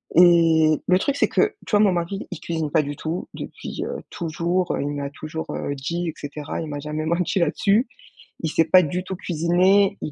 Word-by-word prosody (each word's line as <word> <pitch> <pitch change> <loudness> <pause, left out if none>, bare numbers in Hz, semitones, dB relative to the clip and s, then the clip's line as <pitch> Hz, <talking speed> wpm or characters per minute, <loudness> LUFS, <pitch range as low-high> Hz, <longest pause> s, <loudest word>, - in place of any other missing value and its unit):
Et 165 -3 +5
le 185 0 +4
truc, 280 +5 0
c'est - - +2
que, 420 0 +2
tu - - -9
vois, 205 - +4
mon 200 -3 +4
mari, 175 +4 -3
il 180 - -6
cuisine 160 -3 -3
pas 155 - +3
du 145 0 -5
tout 160 +4 -4
depuis, - - -6
heu, - - -4
toujours. 170 +2 -1
Heu, - - -2
il 145 - -2
me 145 -1 -4
l'a 140 - -3
toujours, 155 +2 -6
heu, 140 - -3
dit, 170 +5 -3
et - - -5
cetera, 145 +1 -6
il 160 - -5
m'a 145 -1 -5
jamais 150 +1 -4
menti 175 +3 0
là-dessus. 200 - +2 0.5
Il 160 - -1
sait 165 +1 +2
pas 185 +3 +6
du 180 +3 -2
tout 190 0 -5
cuisiner, 185 +4 +2
il 150 - -4
170 Hz, 225 wpm, -23 LUFS, 155-185 Hz, 0.5 s, pas